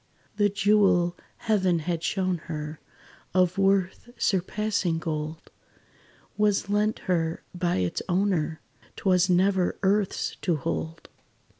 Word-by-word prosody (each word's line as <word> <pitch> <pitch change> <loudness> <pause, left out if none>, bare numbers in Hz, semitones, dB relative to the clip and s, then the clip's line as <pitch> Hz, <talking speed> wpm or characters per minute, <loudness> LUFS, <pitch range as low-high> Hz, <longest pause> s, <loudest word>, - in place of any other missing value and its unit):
The 205 -1 +4
jewel, 195 -3 +3 0.2
Heaven 190 -5 +1
had 165 +1 -2
shown 185 -1 0
her, 150 -1 -5 0.6
Of 185 +1 +3
worth 195 +3 +1
surpassing 195 -2 0
gold, 155 0 -5 0.9
Was 205 -1 +2
lent 210 +1 +1
her, 165 -3 0
by 175 -1 0
its 90 -2 -1
Owner 175 -4 0 0.3
'T - - -11
was 185 -1 +4
never 185 0 +2
earth's 200 0 0
to 175 - 0
hold. 160 +3 -4
185 Hz, 115 wpm, -26 LUFS, 165-200 Hz, 0.9 s, The